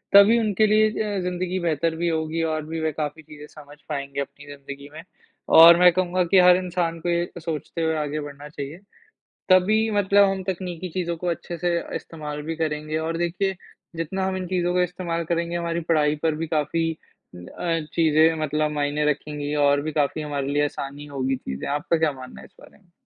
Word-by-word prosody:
तभी 205 Hz, +4 st, +8 dB
उनके 215 Hz, -1 st, +2 dB
लिए 215 Hz, +1 st, +4 dB
अ, 210 Hz, -2 st, -2 dB
ज़िंदगी 180 Hz, +1 st, -2 dB
बेहतर 165 Hz, -1 st, 0 dB
भी 170 Hz, +1 st, -1 dB
होगी, 160 Hz, 0 st, -1 dB
और 155 Hz, -1 st, -2 dB
भी 160 Hz, +1 st, -4 dB
वे 160 Hz, -, 0 dB
काफ़ी 155 Hz, +1 st, -4 dB
चीज़ें 150 Hz, 0 st, -12 dB
समझ 145 Hz, -1 st, -14 dB
पाएँगे 140 Hz, -1 st, -3 dB
अपनी 145 Hz, +1 st, -9 dB
ज़िंदगी 140 Hz, 0 st, -10 dB
में 160 Hz, -, -9 dB, 0.6 s
और 170 Hz, +1 st, +10 dB
मैं 180 Hz, 0 st, +7 dB
कहूँगा 185 Hz, 0 st, +1 dB
कि 190 Hz, -, +7 dB
हर 180 Hz, 0 st, +7 dB
इंसान 175 Hz, -2 st, -2 dB
को 175 Hz, -, -2 dB
ये 170 Hz, 0 st, 0 dB
सोचते 165 Hz, 0 st, -5 dB
हुए 160 Hz, 0 st, +1 dB
आगे 150 Hz, 0 st, -2 dB
बढ़ना 145 Hz, 0 st, -9 dB
चाहिए, 145 Hz, +1 st, -7 dB, 0.7 s
तभी 215 Hz, +5 st, +4 dB
मतलब 200 Hz, 0 st, +4 dB
हम 190 Hz, -1 st, -3 dB
तकनीकी 180 Hz, -1 st, -4 dB
चीज़ों 170 Hz, -1 st, -2 dB
को 180 Hz, -, -6 dB
अच्छे 170 Hz, 0 st, -4 dB
से 175 Hz, +1 st, 0 dB, 0.2 s
इस्तेमाल 150 Hz, -2 st, -6 dB
भी 160 Hz, +1 st, -4 dB
करेंगे। 155 Hz, -1 st, -2 dB
और 165 Hz, +1 st, -2 dB
देखिए, 185 Hz, +3 st, -1 dB, 0.4 s
जितना 190 Hz, +4 st, -2 dB
हम 190 Hz, 0 st, -1 dB
इन 185 Hz, -1 st, -4 dB
चीज़ों 180 Hz, -1 st, 0 dB
का 180 Hz, -, +3 dB
इस्तेमाल 170 Hz, -1 st, -3 dB
करेंगे, 170 Hz, +1 st, -1 dB
हमारी 170 Hz, 0 st, -2 dB
पढ़ाई 150 Hz, -2 st, +3 dB
पर 160 Hz, -1 st, +1 dB
भी 165 Hz, +1 st, -3 dB
काफ़ी 165 Hz, +1 st, 0 dB, 0.5 s
अ, 165 Hz, -, -3 dB
चीज़ें 160 Hz, 0 st, +4 dB
मतलब 150 Hz, 0 st, 0 dB
मायने 145 Hz, 0 st, -1 dB
रखेंगी 150 Hz, 0 st, -4 dB
और 140 Hz, 0 st, +3 dB
भी 155 Hz, -, -4 dB
काफ़ी 150 Hz, +1 st, 0 dB
हमारे 140 Hz, -2 st, -3 dB
लिए 145 Hz, +1 st, +1 dB
आसानी 145 Hz, 0 st, -5 dB
होगी 135 Hz, -2 st, -2 dB
चीज़ें। 70 Hz, -, -6 dB
आपका 150 Hz, +3 st, 0 dB
क्या 160 Hz, -2 st, +2 dB
मानना 130 Hz, -1 st, -11 dB
है -, -, -12 dB
इस -, -, -27 dB
बारे -, -, -17 dB
में? 195 Hz, -4 st, -30 dB
165 Hz, 200 wpm, -24 LUFS, 150-180 Hz, 0.7 s, और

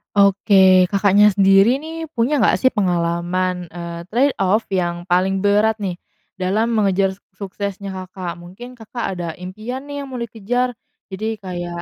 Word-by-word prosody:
Oke, 195 Hz, -2 st, +5 dB
Kakaknya 200 Hz, +1 st, +5 dB
sendiri, 195 Hz, +6 st, +4 dB
nih, 325 Hz, +1 st, -6 dB
punya 250 Hz, +5 st, +1 dB
nggak, 225 Hz, -7 st, +3 dB
sih, 260 Hz, -, +5 dB
pengalaman, 180 Hz, -1 st, -1 dB
eee, 170 Hz, -1 st, -7 dB
trade 270 Hz, +4 st, +2 dB
off, 195 Hz, +3 st, +2 dB
yang 175 Hz, -1 st, -2 dB
paling 190 Hz, +2 st, +2 dB
berat, 210 Hz, +2 st, +2 dB
nih, 185 Hz, -3 st, -3 dB, 0.4 s
dalam 195 Hz, +5 st, 0 dB
mengejar 195 Hz, -3 st, +1 dB, 0.2 s
suksesnya 200 Hz, +1 st, -5 dB
Kakak? 185 Hz, -2 st, -6 dB
Mungkin 205 Hz, +9 st, -11 dB
Kakak 230 Hz, +1 st, -6 dB
ada 170 Hz, -2 st, -4 dB
impian, 215 Hz, +9 st, -7 dB
nih, 285 Hz, -1 st, -5 dB
yang -, -, -11 dB
mau 245 Hz, -, -4 dB
dikejar, 235 Hz, +2 st, -2 dB, 0.3 s
jadi 215 Hz, +3 st, -3 dB
kayak 175 Hz, -2 st, -5 dB
195 Hz, 145 wpm, -20 LUFS, 185-225 Hz, 0.4 s, Oke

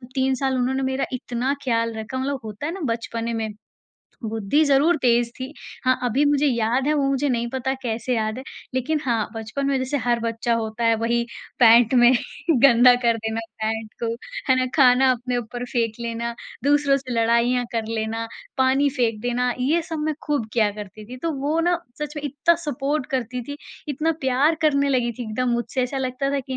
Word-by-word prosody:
3 265 Hz, 0 st, +2 dB
साल 265 Hz, 0 st, 0 dB
उन्होंने 260 Hz, +2 st, 0 dB
मेरा 265 Hz, +1 st, 0 dB
इतना 250 Hz, +2 st, -2 dB
ख़याल 230 Hz, -2 st, 0 dB
रखा 220 Hz, +4 st, -5 dB
मतलब 270 Hz, +1 st, -2 dB
होता 215 Hz, +6 st, -6 dB
है 325 Hz, -, -1 dB
ना 385 Hz, -, -6 dB
बचपने 230 Hz, 0 st, -4 dB
में 220 Hz, -1 st, -2 dB, 0.8 s
बुद्धि 220 Hz, +7 st, +1 dB
ज़रूर 285 Hz, +5 st, +4 dB
तेज़ 235 Hz, -1 st, +3 dB
थी। 260 Hz, +3 st, -6 dB, 0.3 s
हाँ, 255 Hz, 0 st, +3 dB
अभी 255 Hz, +5 st, +2 dB
मुझे 290 Hz, 0 st, +3 dB
याद 240 Hz, +1 st, +1 dB
है 305 Hz, -, +3 dB
वो 280 Hz, -2 st, +1 dB
मुझे 275 Hz, +1 st, +1 dB
नहीं 235 Hz, -1 st, 0 dB
पता 265 Hz, 0 st, -1 dB
कैसे 235 Hz, +1 st, -1 dB
याद 220 Hz, 0 st, -1 dB
है -, -, -6 dB, 0.3 s
लेकिन 295 Hz, +4 st, 0 dB
हाँ, 230 Hz, -4 st, 0 dB
बचपन 225 Hz, +5 st, -3 dB
में 275 Hz, -1 st, +2 dB
जैसे 260 Hz, +3 st, -1 dB
हर 240 Hz, -1 st, +2 dB
बच्चा 230 Hz, +1 st, -1 dB
होता 225 Hz, 0 st, -2 dB
है 230 Hz, 0 st, +4 dB
वही 235 Hz, +1 st, 0 dB, 0.3 s
पैंट 235 Hz, 0 st, +6 dB
में 240 Hz, 0 st, +7 dB, 0.5 s
गंदा 245 Hz, -1 st, +7 dB
कर 230 Hz, -1 st, +4 dB
देना 220 Hz, 0 st, -3 dB, 0.2 s
पैंट 220 Hz, 0 st, -2 dB
को, -, -, +1 dB, 0.4 s
है 260 Hz, -, +5 dB
ना? 255 Hz, 0 st, +1 dB
खाना 260 Hz, -2 st, +5 dB
अपने 245 Hz, 0 st, -3 dB
ऊपर 245 Hz, +1 st, -4 dB
फेंक 230 Hz, -3 st, 0 dB
लेना, 235 Hz, 0 st, -3 dB, 0.3 s
दूसरों 285 Hz, -1 st, +4 dB
से 255 Hz, -2 st, -6 dB
लड़ाइयाँ 235 Hz, +2 st, +2 dB
कर 225 Hz, -1 st, -1 dB
लेना, 225 Hz, +1 st, -2 dB, 0.3 s
पानी 265 Hz, +2 st, +3 dB
फेंक 230 Hz, -5 st, 0 dB
देना, 245 Hz, +1 st, 0 dB
ये 315 Hz, +6 st, +2 dB
सब 320 Hz, -1 st, -5 dB
मैं 310 Hz, -1 st, 0 dB
खूब 290 Hz, -7 st, 0 dB
किया 215 Hz, -3 st, +3 dB
करती 210 Hz, +1 st, -9 dB
थी। 250 Hz, +2 st, -8 dB
तो 330 Hz, -, 0 dB
वो 300 Hz, +4 st, 0 dB
ना 350 Hz, +1 st, +2 dB, 0.2 s
सच 300 Hz, +1 st, -4 dB
मे 295 Hz, -, -4 dB
इतना 290 Hz, +5 st, +2 dB
सपोर्ट 285 Hz, 0 st, -1 dB
करती 250 Hz, -1 st, -2 dB
थीं, 285 Hz, -, -5 dB, 0.3 s
इतना 310 Hz, +4 st, 0 dB
प्यार 270 Hz, +4 st, +3 dB
करने 280 Hz, -2 st, +3 dB
लगी 245 Hz, -3 st, +1 dB
थीं 245 Hz, +1 st, -6 dB
एकदम 250 Hz, +3 st, -1 dB
मुझसे 240 Hz, +2 st, -1 dB
ऐसा 270 Hz, +2 st, -2 dB
लगता 265 Hz, +1 st, -1 dB
था 280 Hz, -1 st, 0 dB
कि 260 Hz, 0 st, -5 dB
250 Hz, 200 wpm, -23 LUFS, 230-275 Hz, 0.8 s, में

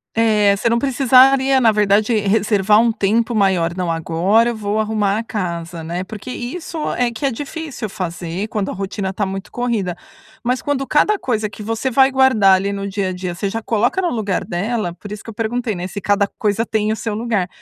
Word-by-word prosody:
É, 210 Hz, -3 st, +3 dB
você 205 Hz, -, -1 dB
não 235 Hz, +1 st, +2 dB
precisaria, 265 Hz, 0 st, +4 dB
na 230 Hz, -2 st, +5 dB
verdade 210 Hz, +2 st, +2 dB
reservar 210 Hz, 0 st, +3 dB
um 230 Hz, 0 st, +3 dB
tempo 225 Hz, +3 st, 0 dB
maior. 185 Hz, -5 st, +2 dB
Não, 180 Hz, -2 st, -1 dB
agora 175 Hz, +8 st, +2 dB
eu 235 Hz, -, -3 dB
vou 210 Hz, 0 st, -2 dB
arrumar 215 Hz, -1 st, 0 dB
a -, -, -3 dB
casa, 170 Hz, -6 st, -4 dB
né. 170 Hz, +3 st, -3 dB
Porque 215 Hz, +5 st, -8 dB
isso 320 Hz, +8 st, -6 dB, 0.2 s
é 245 Hz, -1 st, +1 dB
que 235 Hz, +5 st, -4 dB
é -, -, 0 dB
difícil 285 Hz, -1 st, -5 dB
fazer 180 Hz, 0 st, -4 dB
quando 210 Hz, -3 st, -2 dB
a -, -, -5 dB
rotina 195 Hz, 0 st, -3 dB
está 195 Hz, +2 st, -3 dB
muito 195 Hz, 0 st, -6 dB
corrida, 225 Hz, -8 st, -1 dB, 0.5 s
mas 250 Hz, +1 st, 0 dB
quando 285 Hz, -2 st, -1 dB
cada 405 Hz, +7 st, +2 dB
coisa 220 Hz, -4 st, -1 dB
que 210 Hz, -, -11 dB
você 225 Hz, +4 st, -2 dB
vai 265 Hz, +2 st, +5 dB
guardar 255 Hz, -8 st, +5 dB
ali 195 Hz, +2 st, -1 dB
no 200 Hz, 0 st, -4 dB
dia-a-dia, 185 Hz, -2 st, -3 dB
você 200 Hz, +3 st, -2 dB
já 225 Hz, +3 st, -4 dB
coloca 230 Hz, -, +1 dB
no 355 Hz, -, 0 dB
lugar 210 Hz, -, -1 dB
dela, 195 Hz, +1 st, -2 dB
por 205 Hz, -, -9 dB
isso 210 Hz, -1 st, -7 dB
que -, -, -10 dB
eu -, -, -7 dB
perguntei, 225 Hz, +1 st, -2 dB
né, 175 Hz, 0 st, -4 dB
se 200 Hz, +2 st, -6 dB
cada 205 Hz, 0 st, +2 dB
coisa 210 Hz, +2 st, -1 dB
tem 215 Hz, -1 st, 0 dB
o -, -, 0 dB
seu 220 Hz, -1 st, -4 dB
lugar, 215 Hz, -4 st, -1 dB
215 Hz, 210 wpm, -19 LUFS, 195-235 Hz, 0.5 s, na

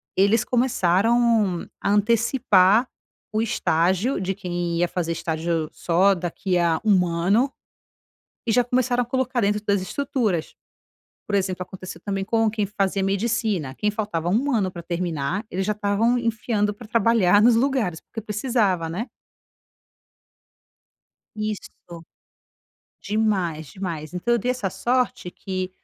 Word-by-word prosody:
eles 200 Hz, +4 st, +3 dB
começaram 230 Hz, -3 st, +2 dB
a -, -, 0 dB
antecipar 215 Hz, 0 st, +3 dB, 0.5 s
o 215 Hz, -, +1 dB
estágio 190 Hz, +2 st, +1 dB
de 190 Hz, +1 st, -1 dB
quem 175 Hz, -3 st, -3 dB
ia 175 Hz, +1 st, +2 dB
fazer 170 Hz, -2 st, -2 dB
estágio 165 Hz, -1 st, -2 dB
só 185 Hz, +4 st, +3 dB
daqui 180 Hz, +1 st, -2 dB
a 170 Hz, -2 st, +2 dB
1 190 Hz, -4 st, +4 dB
ano, 195 Hz, +11 st, +1 dB, 1.0 s
e 225 Hz, -, +2 dB
já 245 Hz, +2 st, +4 dB
começaram 245 Hz, 0 st, +1 dB
a 235 Hz, -, -5 dB
colocar 255 Hz, 0 st, -1 dB
dentro 210 Hz, 0 st, +1 dB
das 200 Hz, -1 st, +2 dB
estruturas. 215 Hz, -, -2 dB, 0.7 s
Por 205 Hz, -, -3 dB
exemplo, 185 Hz, -2 st, 0 dB
aconteceu 185 Hz, 0 st, -9 dB
também 195 Hz, -1 st, -2 dB
com 225 Hz, +1 st, +2 dB
quem 215 Hz, -1 st, -1 dB
fazia 195 Hz, -1 st, -1 dB
medicina. 200 Hz, -, -1 dB
Quem 210 Hz, -, 0 dB
faltava 205 Hz, -6 st, -3 dB
ano 225 Hz, -4 st, +1 dB
pra 175 Hz, -1 st, -8 dB
terminar 170 Hz, +1 st, -2 dB
ele 190 Hz, +2 st, -2 dB
já 210 Hz, -, +1 dB
estavam 210 Hz, +3 st, +1 dB
enfiando 220 Hz, -2 st, 0 dB
pra 215 Hz, +2 st, -12 dB
trabalhar 220 Hz, -4 st, +4 dB
nos 235 Hz, 0 st, +6 dB
lugares, 235 Hz, -, 0 dB
porque 225 Hz, -, -8 dB
precisava, 210 Hz, -5 st, 0 dB
né? 190 Hz, +10 st, -4 dB, 2.3 s
Isso. 215 Hz, -1 st, -3 dB, 1.3 s
Demais, 190 Hz, -8 st, -1 dB
demais 170 Hz, -6 st, -6 dB
então 225 Hz, +7 st, 0 dB
eu -, -, +2 dB
dei 245 Hz, +4 st, -1 dB
essa 250 Hz, -6 st, -1 dB
sorte 250 Hz, -3 st, -1 dB
que 185 Hz, -1 st, -4 dB
205 Hz, 130 wpm, -23 LUFS, 180-230 Hz, 2.3 s, nos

